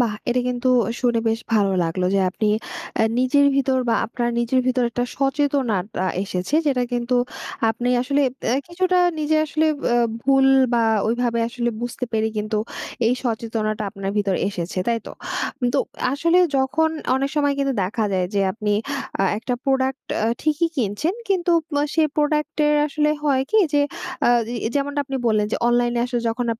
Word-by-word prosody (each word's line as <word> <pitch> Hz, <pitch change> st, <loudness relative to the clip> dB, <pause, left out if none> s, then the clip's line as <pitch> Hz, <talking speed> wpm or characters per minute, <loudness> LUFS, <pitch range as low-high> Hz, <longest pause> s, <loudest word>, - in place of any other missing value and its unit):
বাহ! 230 Hz, -4 st, +1 dB
এটা 250 Hz, +1 st, +2 dB
কিন্তু 250 Hz, +1 st, -1 dB, 0.3 s
শুনে 235 Hz, -2 st, +2 dB
বেশ 225 Hz, +1 st, 0 dB
ভালো 200 Hz, -2 st, +3 dB
লাগলো, 180 Hz, +3 st, -2 dB
যে, 195 Hz, -, +3 dB
আপনি 215 Hz, +3 st, -1 dB, 0.5 s
আ -, -, +5 dB, 0.2 s
নিজের 275 Hz, +3 st, +4 dB
ভিতর 265 Hz, -1 st, +2 dB
বা 230 Hz, -, +3 dB
আপনার 240 Hz, +1 st, -2 dB
নিজের 240 Hz, +2 st, +2 dB
ভিতর 255 Hz, -1 st, +2 dB
একটা 245 Hz, +1 st, -1 dB
সচেতনাটা 270 Hz, -9 st, 0 dB, 0.2 s
এসেছে, 185 Hz, +8 st, -3 dB
যেটা 255 Hz, -3 st, +2 dB
কিন্তু 245 Hz, +1 st, 0 dB, 0.5 s
আপনি 240 Hz, +2 st, -2 dB
আসলে 280 Hz, +2 st, +1 dB, 0.2 s
দে -, -, -2 dB, 0.2 s
কিছুটা 365 Hz, +1 st, +1 dB, 0.2 s
নিজে 310 Hz, +1 st, +1 dB
আসলে 310 Hz, +1 st, +1 dB, 0.3 s
আ -, -, +4 dB, 0.3 s
ভুল 270 Hz, 0 st, +4 dB, 0.3 s
বা 235 Hz, -, +3 dB, 0.2 s
ওইভাবে 235 Hz, 0 st, 0 dB
আসলে 240 Hz, 0 st, -2 dB
বুঝতে 245 Hz, +1 st, -3 dB
পেরে 220 Hz, 0 st, +1 dB
কিন্তু 215 Hz, +1 st, -1 dB, 0.5 s
এই 235 Hz, -, +4 dB
সচেতনাটা 220 Hz, -2 st, -2 dB
আপনার 195 Hz, -1 st, -4 dB
ভিতর 200 Hz, -2 st, +1 dB
এসেছে। 185 Hz, -1 st, -4 dB
তাই 230 Hz, -1 st, +1 dB
তো? -, -, -7 dB, 0.6 s
তো -, -, +4 dB, 0.3 s
আসলে 335 Hz, +5 st, +2 dB, 0.2 s
যখন 315 Hz, +5 st, +2 dB, 0.3 s
অনেক 275 Hz, +1 st, -1 dB
সময় 285 Hz, -1 st, +2 dB
কিন্তু 275 Hz, -1 st, +1 dB
দেখা 215 Hz, +4 st, -1 dB
যায়, 185 Hz, -1 st, +1 dB
যে, 200 Hz, -, +2 dB
আপনি 210 Hz, -1 st, -2 dB, 0.5 s
আ -, -, +3 dB
একটা 245 Hz, +2 st, -2 dB
প্রোডাক্ট 265 Hz, 0 st, 0 dB, 0.2 s
আ -, -, +2 dB, 0.2 s
ঠিকই 310 Hz, +2 st, +1 dB
কিনছেন, 245 Hz, -, -1 dB
কিন্তু 360 Hz, -3 st, +1 dB, 0.2 s
ম -, -, 0 dB, 0.2 s
সে 320 Hz, -, +3 dB
প্রোডাক্ট 300 Hz, +1 st, 0 dB
এর 300 Hz, -, +3 dB
আসলে 300 Hz, +1 st, +1 dB
হয় 270 Hz, -3 st, +2 dB
কি? 440 Hz, -, +4 dB
যে, 290 Hz, 0 st, +4 dB, 0.4 s
আ -, -, +5 dB, 0.4 s
এ -, -, +1 dB
যেমন 280 Hz, +1 st, -1 dB
আপনি 270 Hz, -1 st, -4 dB
বললেন 215 Hz, -2 st, +2 dB
যে, -, -, +2 dB
অনলাইন 240 Hz, 0 st, +2 dB
এ -, -, +2 dB
আসলে 245 Hz, -1 st, -2 dB
যখন 240 Hz, +2 st, -2 dB
245 Hz, 175 wpm, -22 LUFS, 225-285 Hz, 0.6 s, আ